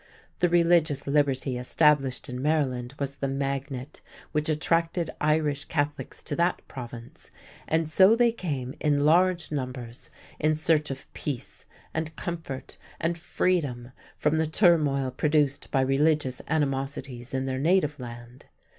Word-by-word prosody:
The 175 - +3
religious 170 -4 +3
liberty 140 -3 +1
established 135 0 +2
in 125 -1 -5
Maryland 135 -4 0
was 140 0 -4
the 140 - -1
magnet 135 0 -3 0.3
which 150 0 -1
attracted 165 +2 +1
Irish 150 -2 +1
Catholics 145 -1 -3
to 145 - -4
that 175 +1 0
Province, 120 -2 -9 0.4
and 160 0 +1
so 190 +7 +6
they 240 0 +4
came 140 - -4
in 145 -1 +2
large 175 +1 +3
numbers 125 -4 -5 0.3
in 155 0 +2
search 155 -1 +1
of 135 -1 -8
peace 135 -4 -5 0.3
and 160 0 -3
comfort 165 -7 -6 0.2
and 170 +1 0
freedom 145 -8 -1 0.3
from 150 +1 +1
the 160 - +1
turmoil 150 -6 +3
produced 145 0 +1
by 135 - +2
religious 135 0 +1
animosities 135 -4 -2
in 130 0 -1
their 130 0 -2
native 150 -1 +2
land. 120 0 -10
145 Hz, 135 wpm, -27 LUFS, 135-160 Hz, 0.4 s, so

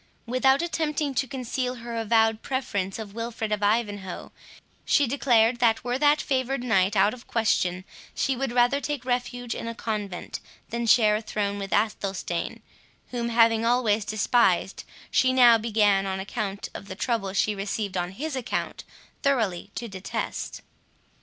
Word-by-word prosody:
Without 265 +5 +3
attempting 305 -4 -1
to 265 +1 0
conceal 255 -1 -3
her 235 -1 -7
avowed 225 0 +2
preference 205 -8 -2
of 215 -3 -7
Wilfred 230 -1 -4
of 210 -1 0
Ivanhoe, 205 -3 -1 0.5
she 290 - +3
declared 240 -3 +3
that, 230 -2 +3
were 245 +1 -1
that 295 +1 +4
favoured 260 -1 -1
knight 205 -4 +2
out 200 +2 +4
of 250 -1 -12
question, 185 -5 0 0.3
she 270 - 0
would 265 0 -2
rather 245 +3 +3
take 290 -4 -3
refuge 245 -1 -2
in - - -5
a 230 - -4
convent, 210 -5 -4 0.3
than 235 0 -2
share 215 -2 +5
a - - -5
throne 205 -2 -2
with 195 -1 -5
Athelstane, 195 -4 -1 0.5
whom, 235 -1 -2
having 230 -1 +4
always 230 -3 +2
despised, 210 -3 +1 0.3
she 260 - +3
now 240 -3 +7
began, 210 -3 +2
on 190 0 -2
account 200 0 -4
of 200 - -8
the 190 - -7
trouble 215 -3 -1
she 205 +2 +1
received 200 0 -3
on 180 0 -2
his 295 +7 -4
account, 255 -3 -3 0.4
thoroughly 220 -10 0
to 235 - -4
detest. 190 -2 -5
230 Hz, 155 wpm, -26 LUFS, 205-250 Hz, 0.5 s, now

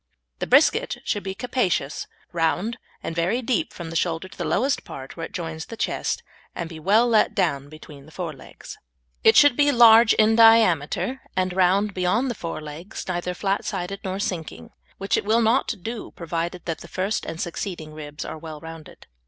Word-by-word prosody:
The - - -2
brisket - - +4
should 205 - -1
be 190 -1 -5
capacious, 195 - -1 0.2
round, 175 +7 0 0.2
and 165 - -4
very 185 +9 0
deep 265 +7 0
from 170 -2 -8
the - - -7
shoulder 165 +2 -1
to - - -15
the - - -4
lowest 270 +5 0
part, 135 0 -9
where 165 -1 -5
it - - -27
joins 160 -3 -5
the 230 - -8
chest, - - -2 0.3
and 170 - -4
be 165 -1 -9
well 210 +9 +4
let 220 -3 +3
down 145 -7 0
between 150 -2 -13
the - - -15
fore 170 -2 -5
legs. 135 - -12 0.4
It - - +6
should 290 -3 +7
be 290 +1 +4
large 230 -2 +7
in 220 0 +4
diameter, 225 - +4 0.2
and 185 -1 +1
round 190 +3 +2
behind 210 +8 +1
the - - -2
fore 165 -7 -6
legs, 155 +7 -8
neither 180 0 -2
flat 195 +2 -1
sided 195 0 -4
nor 190 0 -3
sinking, 160 - -5 0.3
which 195 +1 0
it - - -1
will 225 +3 +3
not 230 +4 +2
do 225 -1 -5
provided 170 +1 -4
that 165 -2 -3
the - - -11
first 195 +3 -2
and 165 - -6
succeeding 170 -3 -5
ribs 150 -1 -7
are 160 - -6
well 155 -1 -8
rounded. 160 0 -11
180 Hz, 195 wpm, -24 LUFS, 160-220 Hz, 0.4 s, should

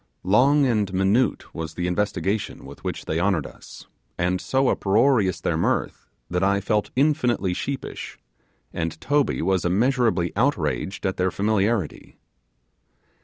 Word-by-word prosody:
Long 135 +10 +4
and 105 -6 +1
minute 100 +7 +1
was 80 -1 -6
the 90 - -2
investigation 100 +2 -2
with - - -12
which - - -4
they 80 - -1
honoured 90 -5 +1
us, - - -12 0.3
and 90 +1 0
so 135 -1 +1
uproarious 105 -1 +2
their - - -1
mirth, - - -1 0.2
that 90 +5 -1
I 100 +1 +3
felt 105 +1 0
infinitely 125 - +1
sheepish; 135 +8 -5 0.6
and 80 -1 -3
Toby 145 - +1
was 95 0 +1
immeasurably 110 -1 +1
outraged 95 - -1
at 95 - -1
their 95 0 +1
familiarity. 100 -2 -1
100 Hz, 130 wpm, -24 LUFS, 90-120 Hz, 0.6 s, Long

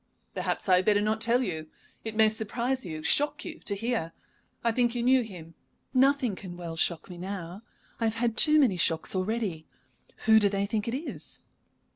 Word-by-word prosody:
"Perhaps - - -2
I 185 -1 +6
had 185 - 0
better 205 -1 +4
not 215 +1 -1
tell 235 +3 +3
you. 160 -7 -4 0.4
It 220 -1 -5
may 220 0 +6
surprise 235 +3 -2
you, 155 -2 -6
shock 290 - +2
you 335 -1 -7
to 200 - -3
hear. 220 -6 -2 0.5
I 235 - +2
think 240 0 +1
you 240 - -1
knew 255 +1 +4
him 175 -7 -9 0.2
" - - -45 0.2
"Nothing 265 -7 -1
can 180 -2 -9
well 170 -2 -6
shock 165 0 -1
me 180 -2 -10
now. 185 0 -6 0.4
I 230 - 0
have 220 0 0
had 230 -1 0
too 305 +2 +6
many 240 -11 +3
shocks 165 -1 +1
already. 190 -4 -2 0.6
Who 220 0 +7
do 205 -2 +3
they 200 0 -1
think 210 +1 -2
it 230 - -1
is?" 320 - -5
215 Hz, 200 wpm, -28 LUFS, 180-235 Hz, 0.6 s, Who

